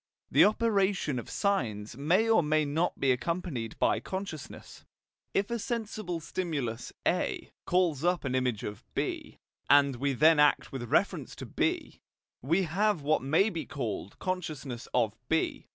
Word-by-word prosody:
The - - +7
operation 200 - +1
of 120 - -9
signs 115 - -1
may 175 - +2
or 225 -5 +5
may 155 0 +2
not 160 +5 -1
be 135 - +3
accompanied 130 - -2
by - - +2
consciousness. 190 -7 -7 0.5
If 200 +3 +1
a 235 - -1
sensible 215 -6 -3
stimulus 145 -9 -3 0.2
A - - -1 0.2
calls 170 -5 +2
up 175 -2 +1
an 130 - -1
image 125 -4 0
of 105 - -6
B, - - -3 0.3
and 140 -2 +5
we 140 +2 0
then 155 +4 +5
act 150 0 +3
with 120 -3 -5
reference - - +1
to - - -7
B, - - -2 0.4
we 165 +9 +2
have 190 0 +1
what 155 +2 +2
may 160 - +3
be 165 -3 -5
called 115 -9 -4
consciousness 150 -9 -4
of 110 -4 +1
B. 160 0 0
155 Hz, 150 wpm, -29 LUFS, 130-185 Hz, 0.5 s, The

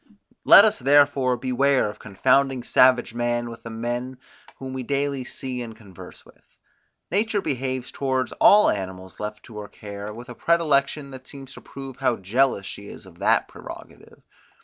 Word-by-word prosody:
Let 200 - +9
us 215 - +1
therefore 135 -2 +3
beware 130 +2 +1
of 105 - -8
confounding 130 +5 +1
savage 125 -1 +3
man 120 0 -2
with 115 0 -11
the 115 - -9
men, 120 +3 -4 0.4
whom 130 -1 -7
we 130 - -4
daily 140 0 -2
see 125 -1 -6
and 115 -2 -8
converse 100 -5 -14
with. - - -21 0.7
Nature 210 +3 +1
behaves 130 -5 -3
towards 130 -2 -2
all 210 +1 +6
animals 95 -1 -6
left 105 0 -6
to 110 -3 -10
her 105 - -7
care 100 0 -8
with 120 +3 -10
a - - -7
predilection, 150 -2 +1
that 130 -1 -11
seems 135 -2 -11
to - - -12
prove 135 -2 -10
how 130 -3 +1
jealous 110 +2 0
she 100 +1 -8
is - - -11
of 85 -2 -17
that - - +2
prerogative. - - -13
130 Hz, 170 wpm, -23 LUFS, 115-135 Hz, 0.7 s, Let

